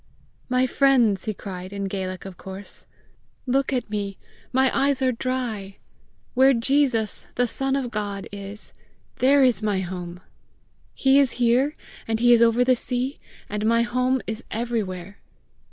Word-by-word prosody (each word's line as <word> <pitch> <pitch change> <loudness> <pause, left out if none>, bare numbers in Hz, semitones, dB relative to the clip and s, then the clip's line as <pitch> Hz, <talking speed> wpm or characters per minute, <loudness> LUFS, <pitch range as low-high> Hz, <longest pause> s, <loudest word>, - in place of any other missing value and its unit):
"My 255 +1 +3
friends," 250 -6 +3
he 215 - -1
cried, 185 -2 -7
in 200 0 -4
Gaelic 185 -1 -4
of 190 -2 -8
course, 190 +2 -9 0.6
"look 270 +1 +1
at 255 -2 -1
me: 205 -2 -4 0.3
my 260 0 +2
eyes 275 0 +2
are 260 - +3
dry! 230 -6 -3 0.6
Where 265 +1 +5
Jesus, 235 -3 +1
the 245 - +2
Son 270 +3 -1
of 260 -4 -2
God, 205 -3 -4
is 200 +1 -7 0.5
there 275 +2 +5
is 250 -4 +3
my 205 -3 0
home! 175 -1 -6 0.8
He 270 +1 +4
is 275 -3 +3
here, 250 +5 +2 0.3
and 225 0 0
he 240 +1 +6
is 235 - +5
over 235 +1 +5
the 255 0 +4
sea, 250 +3 -2 0.3
and 210 +1 -3
my 230 +1 +4
home 255 +2 0
is 220 +2 -5
everywhere! 205 -5 -3
235 Hz, 155 wpm, -24 LUFS, 200-255 Hz, 0.8 s, he